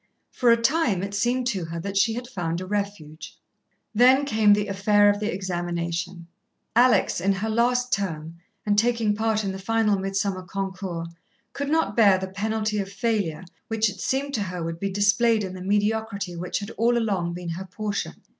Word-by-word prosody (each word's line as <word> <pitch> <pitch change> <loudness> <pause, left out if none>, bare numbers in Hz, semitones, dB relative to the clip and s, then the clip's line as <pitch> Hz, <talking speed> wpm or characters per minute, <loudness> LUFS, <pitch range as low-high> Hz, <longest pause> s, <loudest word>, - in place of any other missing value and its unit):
For 245 - +2
a 235 - +6
time, 230 - +1
it 200 0 -4
seemed 240 +5 0
to 190 -7 -2
her 165 +1 -5
that 200 +3 -5
she 220 +3 +3
had 245 +1 -5
found 175 -8 -3
a 185 - -5
refuge. 200 -6 -5 0.6
Then 255 +5 +5
came 220 -6 +3
the 205 0 +1
affair 205 +1 +4
of 205 - -3
the 215 +2 -1
examination. 175 -1 -3 0.5
Alex, 245 -6 +4
in 195 +2 +2
her 205 +3 -3
last 245 +2 +1
term, 165 -4 -3 0.3
and 205 -1 +3
taking 230 -2 +1
part 220 0 0
in 195 - -2
the 190 - -6
final 215 0 +1
midsummer 195 0 -1
concours, 185 -2 -5 0.4
could 280 0 -3
not 320 -9 +1
bear 205 -5 +6
the 190 0 -4
penalty 215 +2 -1
of 195 0 -4
failure 200 -6 -1 0.2
which 225 -1 +1
it 195 -1 -11
seemed 280 +1 -1
to 220 - 0
her 180 -3 -4
would 165 0 -4
be 195 - -1
displayed 210 +3 +3
in 185 -1 -5
the 185 - -8
mediocrity 205 -1 -1
which 175 +1 -3
had 205 +1 -5
all 235 +1 +3
along 195 -7 -1
been 175 -1 -6
her 175 +3 -5
portion. 210 +2 -4
200 Hz, 190 wpm, -25 LUFS, 185-225 Hz, 0.6 s, a